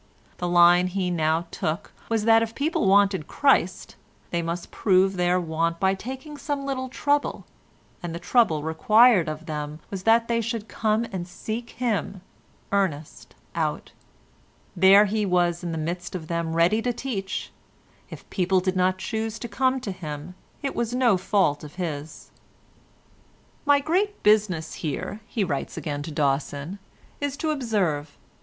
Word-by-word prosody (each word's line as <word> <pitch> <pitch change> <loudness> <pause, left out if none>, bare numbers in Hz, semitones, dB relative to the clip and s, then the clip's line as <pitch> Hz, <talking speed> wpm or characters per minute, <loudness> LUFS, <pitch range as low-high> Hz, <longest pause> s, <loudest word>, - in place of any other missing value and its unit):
The 175 - -1
line 175 +1 +6
he 185 -1 -1
now 160 0 +1
took 155 +2 -3 0.2
was 225 -2 0
that 225 0 +6
if 225 0 -3
people 290 - 0
wanted 195 -4 +3
Christ, 265 -10 +1 0.3
they 170 - 0
must 170 +1 -4
prove 190 -1 +3
their 180 0 +2
want 165 0 -1
by 190 0 +3
taking 265 +8 -7
some 285 -1 -3
little 260 -1 -3
trouble, 285 +2 0 0.6
and 170 -2 -5
the - - -3
trouble 175 -6 +2
required 195 +3 +4
of 155 +1 -6
them 150 -1 -5
was 195 -2 -4
that 230 +3 +4
they 230 0 +1
should 225 -1 -4
come 220 +1 0
and 180 -3 -4
seek 225 +6 -5
him, 215 -5 -1 0.5
Ernest, 180 -7 -2 0.2
out; - - -2 0.8
there 195 +3 +7
he 210 +1 0
was 175 -2 +1
in 170 - -3
the 165 - -3
midst 175 +4 -4
of 160 -4 -6
them 170 -1 -2
ready 175 +7 +3
to 245 - 0
teach; 220 -6 -4 0.6
if - - -11
people 185 0 +2
did 185 +1 -1
not 185 0 +2
choose 220 +2 -3
to 235 - -6
come 260 +2 +1
to 210 - -4
him 160 -2 -7 0.3
it 275 - -1
was 235 +1 -2
no 245 -5 +4
fault 185 -6 +1
of 150 -1 -10
his. 155 -4 -6 1.4
"My 285 0 +6
great 380 +8 -1
business 205 -7 +2
here," 160 +7 -3
he 220 - -1
writes 145 -5 -3
again 145 -2 -3
to 145 - -6
Dawson, 145 +4 -1 0.4
"is 285 -1 -3
to 310 +1 -1
observe. 190 - -1
190 Hz, 160 wpm, -25 LUFS, 165-230 Hz, 1.4 s, there